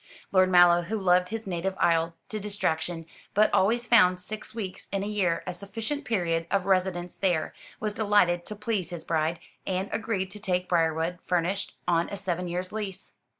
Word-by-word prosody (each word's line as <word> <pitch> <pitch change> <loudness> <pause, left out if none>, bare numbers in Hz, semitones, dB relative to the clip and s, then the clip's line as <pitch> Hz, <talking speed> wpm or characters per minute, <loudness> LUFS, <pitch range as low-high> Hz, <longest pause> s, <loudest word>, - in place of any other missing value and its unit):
Lord 185 -1 +5
Mallow, 175 -1 +6
who 205 +6 -3
loved 180 -2 +3
his 225 0 -4
native 190 0 -2
isle 165 0 +2
to 215 - -3
distraction, 175 -5 -2 0.3
but 215 +1 +4
always 235 +5 +3
found 185 -7 +5
six 215 +4 -5
weeks 195 -5 -5
in 195 0 -1
a - - -3
year 195 -5 0
a 180 - -3
sufficient 225 - -4
period 170 -6 0
of 195 -2 +1
residence 185 -2 0
there, 175 -5 0 0.3
was 215 -4 -2
delighted 205 -5 +3
to 210 - -5
please 210 -3 -2
his 175 -2 -6
bride, 160 +1 0 0.3
and 190 +1 -1
agreed 195 -4 -2
to 210 - -9
take 180 -3 -1
Briarwood, 165 0 +1
furnished, 180 +3 0
on 170 -1 +2
a 200 - -5
seven 180 -2 -2
years' 180 +1 -3
lease. 205 -3 -6
185 Hz, 180 wpm, -27 LUFS, 175-205 Hz, 0.3 s, Mallow